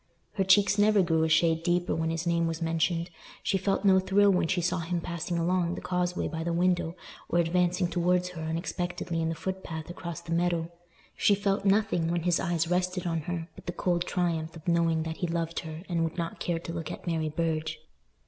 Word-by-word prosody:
Her 195 Hz, -, +1 dB
cheeks 195 Hz, +1 st, +4 dB
never 205 Hz, -1 st, +5 dB
grew 165 Hz, -2 st, +2 dB
a 160 Hz, -, +1 dB
shade 165 Hz, 0 st, +3 dB
deeper 175 Hz, +1 st, +1 dB
when 160 Hz, 0 st, 0 dB
his 165 Hz, +1 st, -2 dB
name 170 Hz, -1 st, +2 dB
was 165 Hz, 0 st, -3 dB
mentioned; 165 Hz, +1 st, 0 dB, 0.3 s
she 195 Hz, -, +1 dB
felt 195 Hz, +1 st, 0 dB
no 190 Hz, -1 st, +6 dB
thrill 200 Hz, +2 st, +4 dB
when 180 Hz, -3 st, +2 dB
she 180 Hz, -, +1 dB
saw 175 Hz, +1 st, 0 dB
him 170 Hz, +1 st, -2 dB
passing 170 Hz, +1 st, -3 dB
along 175 Hz, +1 st, +1 dB
the -, -, -5 dB
causeway 180 Hz, 0 st, -1 dB
by 160 Hz, -1 st, -4 dB
the 170 Hz, -, -1 dB
window, 175 Hz, -1 st, +1 dB, 0.3 s
or -, -, +1 dB
advancing 180 Hz, +1 st, +2 dB
towards 180 Hz, +1 st, +1 dB
her 175 Hz, -3 st, -8 dB
unexpectedly 165 Hz, +1 st, -3 dB
in 160 Hz, -, 0 dB
the 165 Hz, -, -2 dB
footpath 175 Hz, -2 st, -5 dB
across 170 Hz, -1 st, -6 dB
the 170 Hz, -1 st, -9 dB
meadow; 170 Hz, -1 st, 0 dB, 0.4 s
she 205 Hz, -, +4 dB
felt 200 Hz, 0 st, 0 dB
nothing, 195 Hz, -5 st, +2 dB
when 170 Hz, -1 st, 0 dB
his 175 Hz, -1 st, +2 dB
eyes 170 Hz, -2 st, 0 dB
rested 180 Hz, +1 st, 0 dB
on 165 Hz, -1 st, 0 dB
her, 165 Hz, +1 st, -4 dB
but -, -, -15 dB
the 175 Hz, -, -2 dB
cold 175 Hz, 0 st, 0 dB
triumph 165 Hz, -3 st, -1 dB
of 160 Hz, 0 st, -12 dB
knowing 165 Hz, -2 st, +2 dB
that 160 Hz, 0 st, -5 dB
he 175 Hz, -, -1 dB
loved 165 Hz, 0 st, -2 dB
her 160 Hz, 0 st, -7 dB
and 170 Hz, -2 st, 0 dB
would 165 Hz, +1 st, -3 dB
not 170 Hz, -1 st, -3 dB
care 170 Hz, -1 st, -1 dB
to 165 Hz, 0 st, -6 dB
look 165 Hz, -2 st, -4 dB
at -, -, -8 dB
Mary 160 Hz, -3 st, 0 dB
Burge. 160 Hz, 0 st, -1 dB
170 Hz, 215 wpm, -28 LUFS, 165-180 Hz, 0.4 s, no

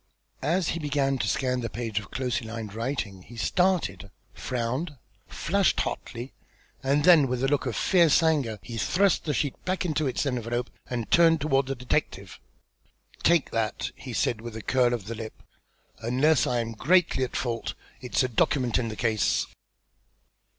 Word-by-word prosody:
As 170 Hz, +1 st, +1 dB
he 170 Hz, -, -2 dB
began 140 Hz, -3 st, 0 dB
to -, -, 0 dB
scan 125 Hz, -1 st, 0 dB
the 115 Hz, -1 st, -3 dB
page 115 Hz, -3 st, -3 dB
of 100 Hz, -, -11 dB
closely 125 Hz, -3 st, -2 dB
lined 110 Hz, -2 st, -6 dB
writing 115 Hz, -5 st, -3 dB
he 120 Hz, +6 st, -13 dB
started, 135 Hz, -, 0 dB, 0.2 s
frowned, 125 Hz, -, -3 dB, 0.3 s
flushed 195 Hz, +2 st, +1 dB
hotly, 120 Hz, +3 st, -5 dB, 0.5 s
and 140 Hz, +2 st, +2 dB
then 165 Hz, -5 st, +7 dB
with 125 Hz, 0 st, -2 dB
a -, -, +3 dB
look 140 Hz, -1 st, +1 dB
of 120 Hz, -, -2 dB
fierce 170 Hz, -3 st, +4 dB
anger 145 Hz, -9 st, +1 dB
he 115 Hz, +4 st, -7 dB
thrust 185 Hz, -, +2 dB
the 150 Hz, -, 0 dB
sheet 145 Hz, -3 st, -2 dB
back 185 Hz, 0 st, -1 dB
into 155 Hz, -3 st, 0 dB
its 130 Hz, +3 st, -1 dB
envelope, 120 Hz, -2 st, -2 dB, 0.2 s
and 120 Hz, -3 st, -4 dB
turned 165 Hz, -1 st, +5 dB
toward 135 Hz, -2 st, +1 dB
the 135 Hz, -, -2 dB
detective. 125 Hz, 0 st, -2 dB, 0.8 s
"Take 170 Hz, -3 st, +3 dB
that!" 110 Hz, -2 st, -1 dB
he -, -, -9 dB
said 110 Hz, -2 st, 0 dB
with 115 Hz, -1 st, -7 dB
a 110 Hz, -, -6 dB
curl 125 Hz, -2 st, +2 dB
of 110 Hz, -5 st, -7 dB
the 115 Hz, -, -4 dB
lip. 110 Hz, -1 st, -8 dB, 0.6 s
"Unless 130 Hz, +6 st, +2 dB
I 120 Hz, -1 st, +1 dB
am 115 Hz, 0 st, -4 dB
greatly 160 Hz, -, +2 dB
at 125 Hz, -, -4 dB
fault, 120 Hz, -2 st, -2 dB, 0.3 s
it's 125 Hz, +1 st, +1 dB
a -, -, +1 dB
document 125 Hz, 0 st, +1 dB
in 120 Hz, -, -1 dB
the 110 Hz, -, -5 dB
case." 110 Hz, -2 st, +1 dB
125 Hz, 170 wpm, -27 LUFS, 115-150 Hz, 0.8 s, then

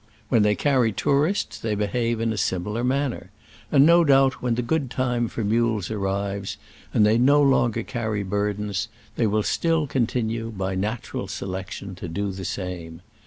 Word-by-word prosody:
When 115 Hz, -4 st, +4 dB
they 105 Hz, 0 st, +3 dB
carry 130 Hz, -4 st, +2 dB
tourists 145 Hz, -, 0 dB
they 110 Hz, -2 st, -1 dB
behave 115 Hz, +3 st, -1 dB
in 115 Hz, 0 st, 0 dB
a -, -, -4 dB
similar 105 Hz, +5 st, -1 dB
manner; 135 Hz, +1 st, -1 dB, 0.4 s
and 140 Hz, 0 st, +6 dB
no 170 Hz, +1 st, +6 dB
doubt 135 Hz, -3 st, +4 dB
when 125 Hz, -2 st, 0 dB
the 125 Hz, -, -1 dB
good 140 Hz, +2 st, 0 dB
time 125 Hz, -2 st, 0 dB
for 115 Hz, -, -4 dB
mules 110 Hz, -2 st, +1 dB
arrives, 100 Hz, -1 st, -2 dB, 0.3 s
and 105 Hz, -, +4 dB
they 110 Hz, +2 st, +4 dB
no 140 Hz, +4 st, +5 dB
longer 120 Hz, -5 st, +3 dB
carry 110 Hz, -4 st, -2 dB
burdens, 105 Hz, +1 st, -2 dB, 0.3 s
they 115 Hz, -, +2 dB
will 105 Hz, +1 st, +1 dB
still 165 Hz, +3 st, +1 dB
continue, 115 Hz, -4 st, -1 dB
by 95 Hz, -3 st, -3 dB
natural 105 Hz, +5 st, -3 dB
selection, 95 Hz, +1 st, -5 dB
to 95 Hz, -, -6 dB
do 100 Hz, +4 st, -2 dB
the 95 Hz, 0 st, -7 dB
same. 90 Hz, -3 st, -5 dB
110 Hz, 165 wpm, -24 LUFS, 100-125 Hz, 0.4 s, and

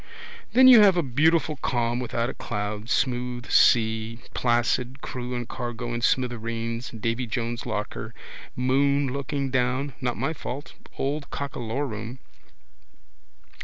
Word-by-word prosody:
Then 255 Hz, +1 st, +8 dB
you 245 Hz, -4 st, +10 dB
have 195 Hz, -3 st, +6 dB
a 175 Hz, -, +2 dB
beautiful 155 Hz, +4 st, +2 dB
calm 120 Hz, -2 st, 0 dB
without 120 Hz, -1 st, -1 dB
a -, -, -4 dB
cloud, 105 Hz, +2 st, -4 dB
smooth 125 Hz, -2 st, -1 dB
sea, 110 Hz, 0 st, +4 dB, 0.2 s
placid, 120 Hz, +2 st, +1 dB
crew 125 Hz, 0 st, -5 dB
and 120 Hz, -1 st, -4 dB
cargo 120 Hz, 0 st, -5 dB
in 120 Hz, -, -3 dB
smithereens, 115 Hz, -1 st, -1 dB
Davy 115 Hz, +2 st, -2 dB
Jones' 115 Hz, +1 st, -3 dB
locker, 105 Hz, +2 st, -4 dB, 0.4 s
moon 140 Hz, +2 st, +2 dB
looking 140 Hz, -1 st, -2 dB
down 130 Hz, +2 st, +1 dB
so -, -, -15 dB
peaceful. 125 Hz, -, -9 dB
Not 125 Hz, -, 0 dB
my 160 Hz, -, -1 dB
fault, 145 Hz, -2 st, -7 dB, 0.2 s
old 140 Hz, +2 st, -2 dB
cockalorum. 125 Hz, -3 st, -4 dB
125 Hz, 130 wpm, -25 LUFS, 115-140 Hz, 0.4 s, you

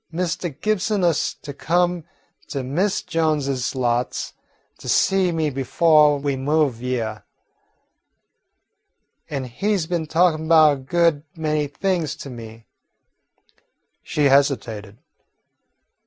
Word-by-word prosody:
Mistah 175 Hz, +1 st, -2 dB
Gibson 205 Hz, +6 st, -1 dB
ust 170 Hz, -3 st, 0 dB
to 145 Hz, -, -7 dB
come 175 Hz, +2 st, 0 dB, 0.4 s
to 140 Hz, -3 st, -4 dB
Mis' 180 Hz, +10 st, -1 dB
Jones's 150 Hz, -7 st, -1 dB
lots 120 Hz, -1 st, -1 dB, 0.5 s
to -, -, -8 dB
see 190 Hz, -2 st, +3 dB
me 160 Hz, -3 st, -1 dB
befo' 150 Hz, +3 st, +4 dB
we 140 Hz, -1 st, -2 dB
moved 140 Hz, -2 st, 0 dB
hyeah, 115 Hz, -4 st, -3 dB, 2.1 s
an' 140 Hz, -3 st, -3 dB
he 195 Hz, -, -1 dB
's 170 Hz, -, -2 dB
been 165 Hz, -2 st, -2 dB
talkin' 160 Hz, -1 st, +2 dB
'bout 155 Hz, -2 st, +6 dB
a -, -, -4 dB
good 155 Hz, +3 st, +1 dB
many 155 Hz, -2 st, -1 dB
things 160 Hz, 0 st, -2 dB
to 140 Hz, -, -9 dB
me." 115 Hz, -1 st, -10 dB, 1.4 s
She 150 Hz, -, -2 dB
hesitated. 125 Hz, -7 st, +1 dB
150 Hz, 110 wpm, -22 LUFS, 135-170 Hz, 2.1 s, bout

